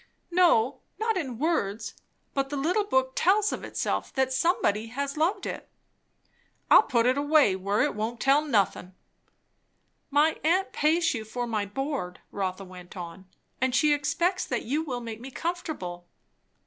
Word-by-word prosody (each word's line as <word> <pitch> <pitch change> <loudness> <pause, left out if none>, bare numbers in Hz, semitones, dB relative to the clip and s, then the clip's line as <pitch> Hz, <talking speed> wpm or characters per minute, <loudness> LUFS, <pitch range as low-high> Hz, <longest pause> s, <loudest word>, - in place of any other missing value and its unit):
"No, 335 -8 +3 0.2
not 445 0 0
in 265 -10 -3
words; 225 -8 -1 0.4
but 270 -1 -1
the 290 - -3
little 360 +9 +1
book 260 -6 +1
tells 405 +7 +3
of - - -5
itself - - -2
that 265 -1 +1
somebody 230 - +1
has 280 +4 -4
loved 360 +6 0
it." - - -6 1.0
"I'll - - +10
put 235 - +1
it 255 +3 +3
away, 290 -8 +4
where 200 +3 0
it - - 0
won't 220 +3 -3
tell 275 +4 +4
nothin'." 200 -8 0 1.1
"My 295 +3 +3
aunt 365 +5 +2
pays 330 +2 +2
you 225 -3 -4
for 245 +3 -4
my 215 -3 -2
board," 270 -5 -4
Rotha 195 -1 -3
went 180 0 -12
on, 180 +2 -8 0.3
"and 260 -1 +1
she 295 +3 +4
expects 345 +6 0
that 245 - -2
you 285 +7 0
will 255 -6 -4
make 230 -1 -7
me 260 - -7
comfortable." 265 - -5
265 Hz, 160 wpm, -27 LUFS, 215-315 Hz, 1.1 s, I'll